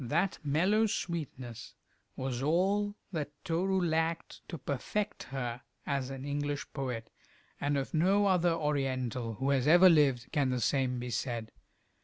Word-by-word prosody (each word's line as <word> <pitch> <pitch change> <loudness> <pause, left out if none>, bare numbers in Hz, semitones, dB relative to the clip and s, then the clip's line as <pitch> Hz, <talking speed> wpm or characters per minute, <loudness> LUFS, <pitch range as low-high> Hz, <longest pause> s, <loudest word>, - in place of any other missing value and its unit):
That 170 +10 0
mellow 185 +10 +3
sweetness 130 - -5 0.4
was 130 -1 -3
all 195 +7 +1 0.2
that 155 -5 -2 0.2
Toru 190 +2 +1
lacked 165 -1 -1
to 170 - -4
perfect 175 +10 -3
her 125 -2 -4 0.2
as 135 -2 -1
an 135 0 -6
English 145 0 -2
poet, 125 -5 -4 0.5
and 145 0 0
of 135 - -3
no 190 +6 +3
other 180 -3 +3
Oriental 130 -7 -1
who 135 +5 0
has 135 0 +2
ever 175 +4 +8
lived 140 -7 +3
can 140 -3 +2
the 125 -1 0
same 130 0 +1
be 125 0 -4
said. 115 -2 -3
145 Hz, 145 wpm, -31 LUFS, 130-170 Hz, 0.5 s, ever